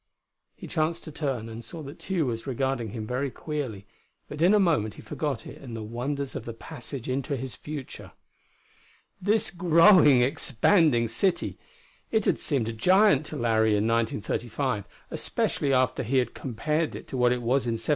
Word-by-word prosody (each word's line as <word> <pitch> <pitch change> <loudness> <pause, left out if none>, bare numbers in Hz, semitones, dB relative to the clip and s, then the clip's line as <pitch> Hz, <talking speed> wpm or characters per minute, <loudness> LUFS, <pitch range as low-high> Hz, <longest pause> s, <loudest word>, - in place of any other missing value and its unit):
He - - -10
chanced 160 +2 -1
to 155 - -8
turn, 135 -7 -3
and 115 +1 -8
saw 165 +3 -8
that 140 +4 -10
Tugh 185 -4 -1
was 115 0 -3
regarding 130 -3 -1
him 110 +1 -5
very 130 +4 -1
queerly; 130 -9 -5 0.4
but 150 - -7
in 185 +5 +6
a - - +5
moment 150 - +2
he - - -11
forgot 145 -4 -3
it - - -10
in 120 -4 -8
the 110 - -5
wonders 130 +5 -4
of - - -5
the 115 - -6
passage 135 -1 -7
into 135 +2 -1
his 130 0 -5
future. 145 -3 -8 1.1
This 210 +3 +1
growing, 170 -6 +6
expanding 135 - +3
city! 170 - 0 0.5
It 220 -2 +1
had - - +2
seemed 135 -7 0
a 115 - -3
giant 180 - +4
to - - -6
Larry 110 -2 +2
in 105 - +1
1935, 115 +1 -1 0.3
especially 140 - -1
after 130 -1 +2
he 130 +3 0
had 125 - +1
compared 150 +6 -2
it - - -9
to - - -5
what 125 -1 +4
it - - +3
was 125 +2 +1
in 115 - +1
1777. 110 - -7
135 Hz, 180 wpm, -27 LUFS, 115-155 Hz, 1.1 s, in